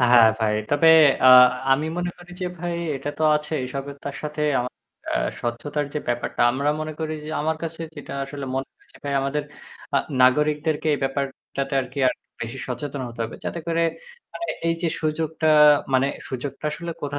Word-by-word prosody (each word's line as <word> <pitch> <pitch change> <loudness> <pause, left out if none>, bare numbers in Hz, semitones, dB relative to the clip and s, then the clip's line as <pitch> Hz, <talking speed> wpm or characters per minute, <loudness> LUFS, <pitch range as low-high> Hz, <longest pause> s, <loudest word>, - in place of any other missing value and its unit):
হ্যাঁ 120 -2 +7
ভাই। 110 -2 +1 0.2
তবে 145 +3 +4 0.4
আ - - +8 0.5
আমি 150 +4 +1
মনে 175 0 -1
করি 175 0 -14
যে 180 - -1
ভাই 175 0 -3 0.2
এটা 140 +2 -6
তো - - -2
আছেই 150 -2 -3
সবে 140 +1 -4
তার 140 - -5
সাথে 150 0 -5 0.2
আমার 125 +1 -4 0.3
অ্যা - - 0 0.2
স্বচ্ছতার 145 +5 -2
যে - - +1
ব্যাপারটা 120 0 -2
আমরা 140 +3 +1
মনে 155 0 -4
করি 155 0 -2
যে 155 - -6
আমার 160 +1 0
কাছে 165 0 -5 0.2
যেটা 145 - -8
আসলে 140 0 -7
মনে 135 0 -2
হয় - - -29
যে - - -16
ভাই 140 - -2
আমাদের 140 +2 -1 0.5
আ - - +5 0.3
নাগরিকদেরকে 150 +4 +2
এই - - -3
ব্যাপারটাতে 135 0 -3
আরকি 125 +1 -7
আরেকটু - - -1 0.2
বেশি 115 +3 -5
সচেতন 135 +3 -4
হতে 115 0 -10
হবে। 115 - -7
যাতে 170 - -3
করে 165 0 +1 0.5
মানে 340 - -5 0.2
এই 165 - +2
যে 170 - +2
সুযোগটা 160 0 0 0.5
মানে 130 +1 +4 0.2
সুযোগটা 135 +3 -6
আসলে 170 +2 -5
কোথা 145 0 -3
145 Hz, 185 wpm, -23 LUFS, 135-155 Hz, 0.5 s, আ